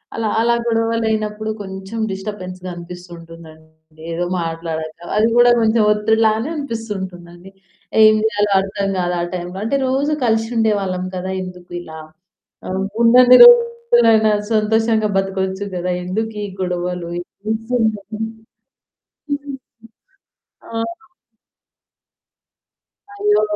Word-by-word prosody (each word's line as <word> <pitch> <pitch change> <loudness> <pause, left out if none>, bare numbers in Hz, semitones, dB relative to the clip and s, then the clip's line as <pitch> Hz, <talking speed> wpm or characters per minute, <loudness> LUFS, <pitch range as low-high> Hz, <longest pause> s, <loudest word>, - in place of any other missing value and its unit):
అలా 225 -1 -1
అలా 235 +1 +3
గొడవలయినప్పుడు 220 -2 -1
కొంచెం 190 +3 -7
డిస్టర్బెన్స్‌గా 185 -2 -6
అనిపిస్తుంటుందండి 165 -2 -13
ఏదో 175 +2 -2 0.2
మాట్లాడక 165 0 -5
అది 215 +2 +4
గూడా 240 0 +6
కొంచెం 225 0 +3
ఒత్తిడిలానే 220 +3 +2
అనిపిస్తుంటుందండి. 190 - -6 0.5
ఏం 215 0 +8
జేయాలో 205 -2 0
అర్థం 195 +1 -2
కాదా 175 0 -1 0.2
టైంలో, 180 +1 -5
అంటే 255 +5 0
రోజు 275 +3 0
కలిసి 225 0 +1
ఉండేవాళ్ళం 200 -4 0
కదా! 185 +1 -4
ఎందుకు 180 -1 -11
ఇలా 160 -2 -10 1.0
ఉన్నన్ని 250 +2 +7
రోజులైనా 470 - +5 0.2
సంతోషంగా 220 0 +2
బతకొచ్చు 190 0 -2
గదా! 180 +1 -2
ఎందుకు 220 +4 -3
ఈ - - -8
గొడవలు. 180 -1 -3 0.4
నిజంగా 220 -1 -1
హ్మ్. 220 +1 -3 2.4
ఆ! - - -11 2.4
అయ్యో! 415 - +2
210 Hz, 95 wpm, -19 LUFS, 180-225 Hz, 2.4 s, ఏం